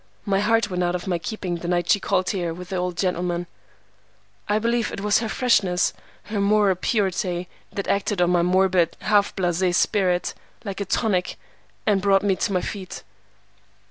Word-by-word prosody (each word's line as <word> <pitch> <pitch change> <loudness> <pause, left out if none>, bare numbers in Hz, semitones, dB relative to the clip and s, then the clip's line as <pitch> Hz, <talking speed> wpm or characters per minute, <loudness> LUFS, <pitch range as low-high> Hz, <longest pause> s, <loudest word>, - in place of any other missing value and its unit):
My 195 -1 +1
heart 225 +1 +2
went 180 0 -1
out 175 0 +1
of 180 - -4
my 180 -3 -1
keeping 180 -2 -4
the 170 - -6
night 175 0 +1
she 205 - +4
called 185 -1 0
here 175 -4 -2
with 180 +1 -9
the 190 - -3
old 180 -1 -2
gentleman. 175 -1 -1 1.0
I 210 - +3
believe 235 +1 0
it - - -5
was 210 +1 +3
her 225 -1 -3
freshness, 200 -8 +2 0.3
her 210 -1 -3
moral 205 -1 +4
purity, 185 -2 -1 0.2
that 200 - -4
acted 200 -1 0
on 175 0 +3
my 175 -1 +3
morbid, 185 -1 +2
half 205 -1 +2
blasé 180 -1 +1
spirit, 180 -4 +1 0.3
like 200 -1 -4
a - - -1
tonic, 190 -2 0 0.5
and 205 -3 +2
brought 195 0 +3
me 200 -2 +2
on 195 - -1
my 180 - +2
feet. 190 -3 -6
190 Hz, 180 wpm, -23 LUFS, 180-205 Hz, 1.0 s, she